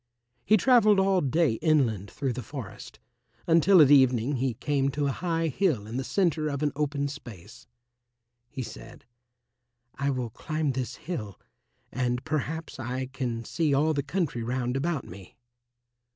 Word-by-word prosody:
He 215 - +4
travelled 215 -2 +5
all 190 -1 +3
day 145 -4 +1
inland 120 - +1
through 135 -3 -3
the 125 - -5
forest, 130 -7 -9 0.5
until 170 +3 +5
at 140 - +4
evening 130 -1 +4
he 125 -2 -1
came 140 +2 0
to 145 +1 -2
a 140 - +1
high 165 +2 -1
hill 145 - 0
in 115 +3 -5
the 130 - -2
centre 165 -2 0
of 140 0 -3
an 145 - +1
open 145 -1 -1
space. 120 - -11 0.8
He 130 - -5
said, 110 -1 -11 0.9
"I 140 0 -2
will 125 -4 -2
climb 155 +3 -2
this 125 -2 -4
hill, 130 - -6 0.5
and 125 -1 -2
perhaps 155 0 -3
I 130 +1 -4
can 120 -4 -3
see 155 0 0
all 155 +3 +2
the 140 - 0
country 145 -4 -2
round 125 +1 -2
about 145 0 -1
me." 95 +2 -12
140 Hz, 155 wpm, -27 LUFS, 125-155 Hz, 0.9 s, travelled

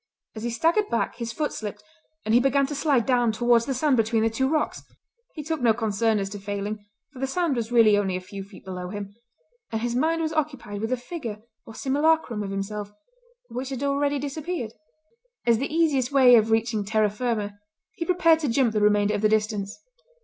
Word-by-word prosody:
As 215 - -6
he 240 - -2
staggered 330 - +1
back 230 - -1
his 235 -1 -4
foot 300 +6 -2
slipped, 210 -1 -6 0.4
and 215 - +1
he 240 - +7
began 275 +2 +3
to 285 - -5
slide 280 -4 +2
down 245 -3 +3
towards 235 +1 +2
the 270 - 0
sand 275 0 +2
between 225 0 +2
the 225 - +2
two 265 +4 0
rocks. 310 0 -1 0.5
He 305 - -5
took 320 -1 -3
no 230 -3 +4
concern 220 -1 +1
as 195 -1 -1
to 205 - -6
falling, 205 +1 -4 0.3
for 255 - -11
the 270 - -1
sand 335 0 0
was 230 -1 -3
really 225 -3 +6
only 195 -2 0
a - - -2
few 195 +1 -8
feet 195 0 -15
below 180 -1 -6
him, 200 0 -6 0.6
and 225 - -1
his 240 0 -1
mind 325 +6 +1
was 315 0 -2
occupied 270 -10 -3
with 225 - -2
the 255 - 0
figure 240 -6 -7 0.2
or 225 - -10
simulacrum 285 -4 +1
of 200 - -4
himself, 200 +1 -4 0.6
which 255 +2 -5
had 265 0 -4
already 280 +1 +1
disappeared. 290 -3 -4 0.7
As 230 -2 +4
the 275 - -3
easiest 295 -6 +2
way 260 -3 +6
of 220 -1 +4
reaching 225 -1 +1
terra 215 0 +1
firma 210 -3 -3 0.3
he - - -4
prepared 335 -2 +4
to 300 -4 -1
jump 235 -1 +2
the 210 - +1
remainder 210 0 +3
of 205 - -1
the 215 - +4
distance. 215 -2 -1
235 Hz, 210 wpm, -25 LUFS, 210-280 Hz, 0.7 s, he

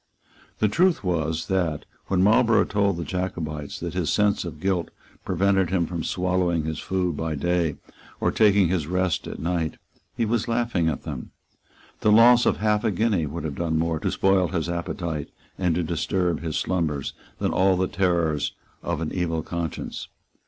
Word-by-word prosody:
The 110 - +3
truth 175 - +2
was 80 -3 -1
that, 90 -6 -1 0.2
when 95 -1 +2
Marlborough 110 +2 +4
told 100 -3 +1
the 85 - -3
Jacobites 80 -5 -4
that 85 -1 -4
his 90 -3 -1
sense 105 0 +2
of 80 -4 -7
guilt 95 -1 0 0.4
prevented 95 0 +2
him 90 -2 +1
from 85 -1 -4
swallowing 90 -2 0
his 80 0 -3
food 90 -3 -1
by 80 0 -2
day 85 0 0 0.4
and - - 0
taking 100 -4 +5
his 85 -5 0
rest 90 0 0
at - - -6
night, 85 -1 -2 0.4
he 115 - +1
was 115 +1 0
laughing 115 -8 +1
at 70 - -4
them. - - -6 0.7
The 105 - +3
loss 120 +3 +7
of - - +2
half 105 0 +1
a 115 - +2
guinea 100 -5 +1
would 85 +4 -5
have 80 -2 -3
done 80 +1 -1
more 80 0 0
to - - -1
spoil 95 -2 +3
his 85 -3 -2
appetite 85 -3 -3 0.3
and 90 -3 +1
to 90 - 0
disturb 85 +1 0
his 80 -2 -2
slumbers 80 -7 -1 0.2
than - - 0
all 95 0 +3
the 95 0 +1
terrors 85 -6 0 0.3
of - - -2
an 80 - -2
evil 80 -3 -1
conscience. 85 -3 -4
90 Hz, 175 wpm, -25 LUFS, 80-95 Hz, 0.7 s, loss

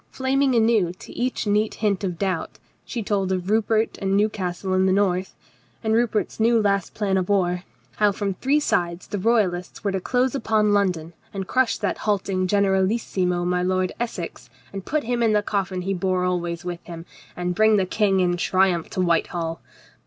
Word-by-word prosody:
Flaming 265 0 +1
anew 220 -6 +3
to 180 - -12
each 250 0 -2
neat 210 +1 +1
hint 205 -3 0
of 180 -3 -2
doubt, 185 -3 -2 0.3
she 235 -3 -4
told 195 -2 0
of 185 +1 -2
Rupert 220 0 +1
and 195 0 +1
Newcastle 190 -3 -1
in 185 0 +3
the - - +3
north, 190 -1 +1 0.5
and 220 0 +1
Rupert's 225 -2 0
new 230 +1 +4
last 200 -3 0
plan 195 -3 0
of 185 0 -1
war: 180 -2 +1 0.3
how 210 -1 +4
from 200 0 -2
three 275 +9 +1
sides 175 -10 -1
the 205 - -4
Royalists 190 -5 0
were 200 - 0
to 190 -1 -2
close 250 +4 +1
upon 215 -5 +2
London 180 -5 0 0.2
and 195 -1 -3
crush 255 +3 +1
that - - -2
halting 195 -3 0
generalissimo 190 -2 +1
my 180 0 +1
Lord 185 0 0
Essex 175 - -5 0.2
and 195 -1 -5
put 305 0 -1
him 240 +1 -1
in 225 -2 +3
the 210 0 +2
coffin 190 -3 -2
he 195 +2 -1
bore 185 0 0
always 175 -1 -2
with 175 -1 -5
him, 170 -1 -8 0.3
and 180 0 -1
bring 215 +3 +4
the 190 - +2
King 195 0 +2
in 175 -1 +1
triumph 185 -2 +1
to 185 - -2
Whitehall. 170 -1 0
195 Hz, 185 wpm, -23 LUFS, 180-215 Hz, 0.5 s, new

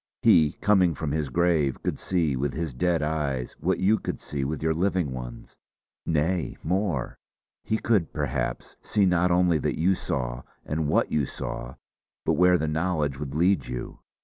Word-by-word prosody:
He, 75 -2 +5
coming 95 -6 +3
from 75 +1 -3
his 75 -2 -1
grave, 80 -3 +1
could - - -2
see 85 -7 0
with 70 +1 -2
his 80 -3 -3
dead 85 +5 +1
eyes 75 -5 -2
what - - +1
you 105 +4 +3
could - - -4
see 70 -2 -4
with 75 +2 -3
your 80 0 +2
living 90 -3 0
ones. - - -8 0.5
Nay, 80 +3 0
more; 90 -5 -1 0.4
he 110 - 0
could, 105 -7 +1
perhaps, 75 -3 -3
see 105 -2 +2
not 90 -1 +3
only 90 -2 +3
that - - -2
you 90 +4 +4
saw, 60 -8 -3 0.2
and 75 0 -1
what - - +2
you 75 -4 +1
saw, - - -6 0.5
but - - +3
where 90 0 +5
the 80 - -1
knowledge 75 -3 -1
would 70 -1 -5
lead 90 +5 +2
you. 60 -1 -6
80 Hz, 175 wpm, -26 LUFS, 70-90 Hz, 0.5 s, He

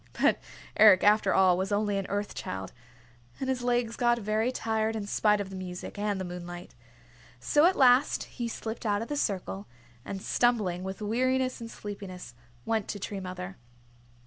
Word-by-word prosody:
But - - +4 0.4
Eric, 205 -4 +8
after 205 -1 +4
all, 185 -2 +5
was 190 +2 -2
only 205 0 +1
an 195 - -4
Earth 205 +1 -2
Child, 95 0 -6 0.7
and 265 - -3
his 260 -1 -1
legs 240 -1 0
got 240 -1 +2
very 215 +2 0
tired 220 -2 -1
in 215 -2 -3
spite 210 0 +2
of 195 -1 -4
the - - -7
music 185 +2 -7
and 205 -1 -1
the 190 - -3
moonlight. 175 0 -8 0.7
So 295 - +3
at 375 - +2
last 255 0 +4
he 240 -2 -5
slipped 225 0 -5
out 205 +1 +1
of - - -9
the 295 - -2
circle, 180 - -2 0.4
and 195 +7 -5
stumbling 205 -6 +1
with 190 +2 -5
weariness 255 +4 0
and 230 - -6
sleepiness 195 - -8 0.3
went 220 -3 0
to 205 - -4
Tree 200 +1 -4
Mother. 185 0 -6
205 Hz, 175 wpm, -29 LUFS, 190-230 Hz, 0.7 s, Eric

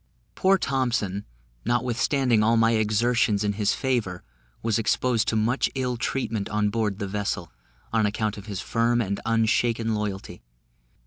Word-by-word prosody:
Poor 195 0 +3
Thompson, 120 - -1 0.4
notwithstanding 120 0 +1
all 115 +2 +3
my 115 0 +4
exertions 110 -1 +2
in 105 0 0
his 105 0 +1
favour, 115 -9 -1 0.4
was 115 -1 +1
exposed 115 0 +1
to 110 - +1
much 115 +5 +1
ill 125 -2 -1
treatment 115 -3 -2
on 105 -1 +1
board 105 -3 -1
the 100 - -3
vessel, 100 -3 -3 0.4
on 110 -2 +3
account 105 0 -1
of 105 +1 -10
his 100 -3 -4
firm 120 +1 +1
and 100 -3 -1
unshaken 115 0 +1
loyalty. 105 -2 -4
110 Hz, 145 wpm, -25 LUFS, 105-120 Hz, 0.4 s, my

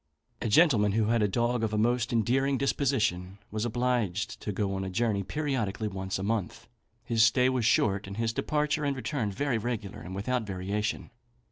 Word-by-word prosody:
A - - -1
gentleman 105 - +4
who 110 0 +1
had 115 -1 +2
a 105 - +3
dog 120 +3 0
of 110 -1 -1
a - - +1
most 120 +2 +1
endearing 130 +4 +2
disposition, 110 -9 0
was 110 +2 -2
obliged 120 -5 -1
to 105 - -3
go 100 -1 -1
a 95 0 -3
journey 105 0 0
periodically 115 -5 -2
once 95 -1 -3
a 95 - -4
month. 105 -3 -2 0.4
His 115 -2 +1
stay 125 +3 +5
was 125 -4 +1
short, 100 -2 +2
and 100 +1 -7
his 115 0 0
departure 150 +4 0
and 140 -1 0
return 130 -5 -2
very 120 +3 -1
regular, 105 -4 -4
and 95 +3 -7
without 125 +6 -1
variation. 105 +3 -3
110 Hz, 180 wpm, -29 LUFS, 100-125 Hz, 0.4 s, stay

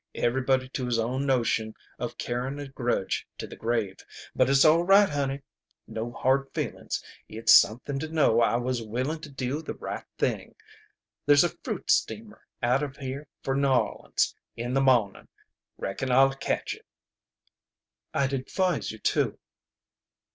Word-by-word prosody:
Everybody 130 +1 +1
to 130 -1 -3
his 120 -2 +1
own 125 +5 -1
notion 115 -4 +1 0.2
of - - -4
carryin' 125 +3 -3
a 145 -1 -6
grudge 120 -7 -2
to - - -5
the - - -10
grave. 110 -4 -1 0.4
But - - +3
it's 135 +2 +5
all 160 +2 +6
right, 195 +3 +6
honey. 140 -2 -2 0.4
No 115 +2 -5
hard 135 +2 +1
feelin's. - - -3 0.3
It's 110 0 +4
something 125 +7 +4
to 160 - -4
know 145 -8 +3
I 115 - +3
was 125 0 -1
willin' 130 +8 -2
to 155 - -9
do 135 +2 -3
the 160 - -6
right - - -5
thing. - - -2 0.7
There's 145 +1 +7
a 175 - -1
fruit - - -2
steamer 215 -1 -1 0.2
out 125 +3 +3
of 140 -2 -4
here 135 +2 -6 0.2
for 135 - 0
N'Orleans 135 -2 +1 0.2
in 120 +2 -3
the 135 - +3
mawnin'. 120 -7 +2 0.5
Reckon 130 +7 -3
I'll 135 +2 +5
catch 135 - -2
it." - - -15 1.2
"I'd 140 0 0
advise 175 +6 -1
you 110 - -9
to." - - 0
130 Hz, 155 wpm, -27 LUFS, 120-140 Hz, 1.2 s, There's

